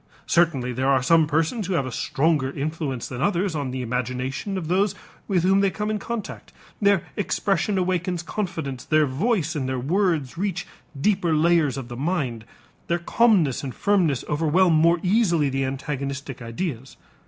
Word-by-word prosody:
Certainly 135 -8 +2
there 130 +2 0
are 135 -2 +3
some 160 +3 +4
persons 160 +7 0
who 195 - -1
have 140 -6 +1
a 130 - -5
stronger 145 +2 +1
influence 140 -3 -3
than 125 0 -6
others 190 +1 +1
on 145 -4 -2
the 130 0 -4
imagination 125 - -3
of 170 -4 -4
those 195 +3 +1 0.3
with 185 -5 +1
whom 190 +2 +4
they 200 0 +3
come 210 +2 -3
in 215 - -1
contact; 225 -1 -6 0.3
their 200 -3 +4
expression 200 -1 0
awakens 180 -1 -1
confidence, 165 -10 -4
their 155 -1 +3
voice 160 - 0
and 130 -3 -2
their 130 - -1
words 165 0 0
reach 195 -3 -2 0.3
deeper 175 -2 +2
layers 160 -3 +3
of 130 -3 -5
the 120 - -7
mind, 135 -7 -2 0.4
their 170 - +1
calmness 175 - +2
and 130 -3 -5
firmness 180 -10 +1
overwhelm 165 +4 +3
more 165 +2 +4
easily 180 -7 +2
the 135 0 -1
antagonistic 135 0 -4
ideas. 125 +2 -5
160 Hz, 165 wpm, -24 LUFS, 135-185 Hz, 0.4 s, some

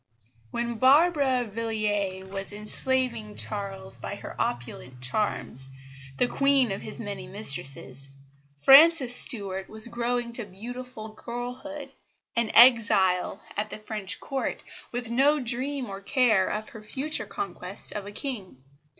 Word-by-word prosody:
When 235 - -3
Barbara 275 -1 +4
Villiers 205 -3 -2
was 195 +1 -5
enslaving 225 +1 +1
Charles 195 - -5
by - - -6
her - - -9
opulent 125 +1 -5
charms, 130 - -2 0.5
the 245 - +3
queen 275 -3 +2
of 195 - -4
his 215 - -7
many 200 -4 -6
mistresses, 140 -7 +1 0.5
Frances 270 - +7
Stuart 195 -7 +3
was 220 0 -1
growing 235 0 -2
to 235 - -2
beautiful 225 +3 -8
girlhood, 250 +6 -7 0.4
an 235 -2 +1
exile 215 -7 +5
at 210 +1 -2
the - - -6
French 215 -1 -3
Court, 270 -1 -4 0.3
with 245 -1 -4
no 285 +5 +3
dream 255 +2 -2
or 195 -1 -7
care 220 -4 +2
of 215 +1 -4
her 225 - -11
future 275 +8 -2
conquest 405 - -4
of 205 -1 -6
a - - -7
king. 205 - -6
225 Hz, 130 wpm, -26 LUFS, 195-255 Hz, 0.5 s, Frances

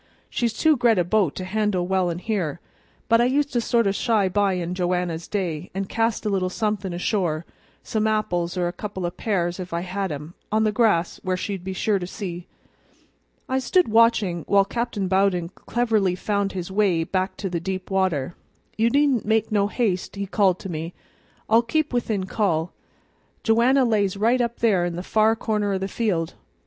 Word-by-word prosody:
"She's 235 -1 0
too 310 +6 +3
gre't 235 -3 +3
a 180 - +3
boat 180 -3 +1
to 185 - -5
handle 205 -2 0
well 185 -1 +1
in 170 - -3
here; 180 -6 -2 0.5
but 230 0 +4
I - - +4
used 285 +3 +1
to 240 - +2
sort 230 0 +2
of 195 - +2
shy 210 -2 +2
by 200 0 +2
in 180 -1 -2
Joanna's 180 -2 -1
day, 180 -5 -3
an' 195 0 -1
cast 225 +2 -1
a - - +1
little 190 -2 0
somethin' 210 -1 -2
ashore 175 -2 -1 0.4
some 220 0 0
apples 180 -5 -1
or 175 -1 +1
a 175 - -3
couple 190 -1 -5
o' 175 - -1
pears 175 -3 -1
if 180 -1 -6
I 170 - -1
had 190 +1 -3
'em 150 +3 -6 0.2
on 215 +1 +2
the 215 - +2
grass, 210 -7 +2
where 185 -1 -1
she'd 195 -1 -4
be 190 +1 -4
sure 200 +1 +1
to 180 - -5
see." 180 -3 -6 1.0
I 260 0 0
stood 350 +4 +2
watching 220 -7 +3
while 200 -1 +4
Captain 230 -2 -2
Bowden 190 -2 +2
cleverly 215 -3 0
found 200 +1 -1
his 185 -1 -5
way 190 -5 +2
back 185 +2 -2
to 200 - -3
deeper 185 +2 -3
water. 175 -6 0 0.5
"You 230 +1 +4
needn't 280 -2 +2
make 220 0 +1
no 205 -1 +2
haste," 205 -5 -1
he 200 0 -3
called 190 -2 +2
to - - -6
me; 165 +1 -5 0.5
"I'll 225 +2 +5
keep 300 +5 -1
within 220 -5 -1
call. 180 -5 0 0.7
Joanna 245 +4 +4
lays 205 -4 +1
right 235 +5 +3
up 235 -1 -2
there 205 -6 +3
in 175 -1 -2
the 175 - -5
far 220 +2 +3
corner 210 -2 -1
o' - - +1
the 190 +1 -3
field. 195 -7 -1
195 Hz, 195 wpm, -23 LUFS, 180-220 Hz, 1.0 s, I'll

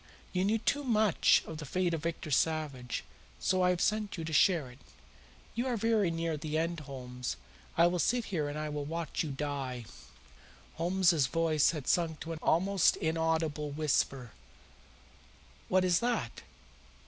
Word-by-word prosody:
You 185 0 +1
knew 215 +3 +2
too 280 +6 0
much 220 -6 +3
of 160 -1 -7
the - - -5
fate 175 +4 0
of 165 - -2
Victor 165 -1 -4
Savage, 145 -5 0 0.3
so 185 0 +1
I 180 - +4
have 180 -1 +1
sent 210 -1 0
you 165 - -4
to 160 - -5
share 155 -4 +3
it. 125 - -16 0.7
You 240 +3 -1
are 245 -2 0
very 220 -3 +2
near 165 -2 -2
your 155 0 -1
end, 170 0 -3
Holmes. 125 -3 -6 0.4
I 170 - +6
will 175 +1 +1
sit 240 +7 +1
here 155 -6 -2
and 145 - -5
I 155 0 -3
will 150 -1 -3
watch 165 +1 -3
you 155 - -2
die." 135 -4 -4 0.9
Holmes's 170 -4 +3
voice 160 -1 +2
had 150 -6 -4
sunk 165 -3 +1
to 165 - -5
an 160 - -7
almost 190 +3 +3
inaudible 160 -2 0
whisper. 140 -4 0 1.4
"What 185 0 +3
is 180 -1 +3
that?" 235 - -2
165 Hz, 165 wpm, -31 LUFS, 150-185 Hz, 1.4 s, I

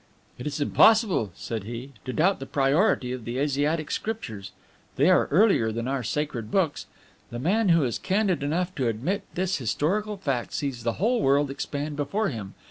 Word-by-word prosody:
"It 125 - -4
is 150 0 -3
impossible," 195 - +4
said 110 -1 -5
he, 120 +4 -7
"to 130 - -3
doubt 180 +8 +2
the 135 - -7
priority 140 - +2
of 125 -2 -5
the 120 +3 -4
Asiatic 145 +3 0
Scriptures; 110 - -4 0.4
they - - +4
are - - +4
earlier 175 - +4
than 115 +2 -3
our 135 0 -1
sacred 125 -3 -3
books. 165 0 0 0.4
The 120 - -6
man 195 - +1
who 165 -3 +5
is 120 -3 -1
candid 190 -3 +1
enough 175 +6 -1
to 130 -4 +1
admit 130 - -1
this 185 +1 0
historical 195 - -1
fact 135 -10 -2
sees 135 -4 -3
the 115 0 -1
whole 230 +6 +1
world 140 +1 +3
expand 145 +1 -4
before 200 +9 0
him. 105 - -7
145 Hz, 180 wpm, -26 LUFS, 125-185 Hz, 0.4 s, who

